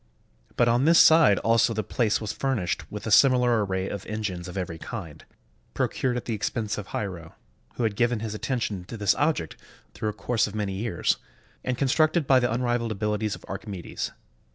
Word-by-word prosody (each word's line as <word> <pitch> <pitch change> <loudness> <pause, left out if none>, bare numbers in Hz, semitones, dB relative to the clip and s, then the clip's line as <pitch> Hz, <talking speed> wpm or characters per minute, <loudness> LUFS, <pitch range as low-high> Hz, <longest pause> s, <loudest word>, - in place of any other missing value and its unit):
But 120 - +3
on 120 +3 +3
this 165 +1 +6
side 160 -13 +7
also 115 0 +3
the 110 - -1
place 110 +1 0
was 110 -2 -4
furnished 90 - -2
with 105 - -6
a 110 - -2
similar 125 -2 +5
array 95 -1 -2
of 100 - -5
engines 100 -5 -4
of 90 - -7
every 85 -3 -4
kind, 85 -10 -7 0.5
procured 125 -2 0
at 125 - -5
the 115 - -2
expense 105 0 -2
of 100 - -7
Hiero, 90 -6 -5 0.4
who 125 - -2
had 110 -3 0
given 120 +1 +1
his 110 -2 -4
attention 110 -4 -2
to 115 - -8
this 105 -2 +3
object 145 - -1 0.4
through 110 - -2
a - - -4
course 115 -1 0
of 105 - -8
many 105 -2 -2
years, 100 -2 0 0.5
and 125 -1 -2
constructed 155 +5 +2
by 130 -1 +5
the 120 -2 0
unrivaled 120 -2 -1
abiHties 105 0 -1
of - - -14
Archimedes. 95 -2 -5
110 Hz, 190 wpm, -26 LUFS, 100-120 Hz, 0.5 s, side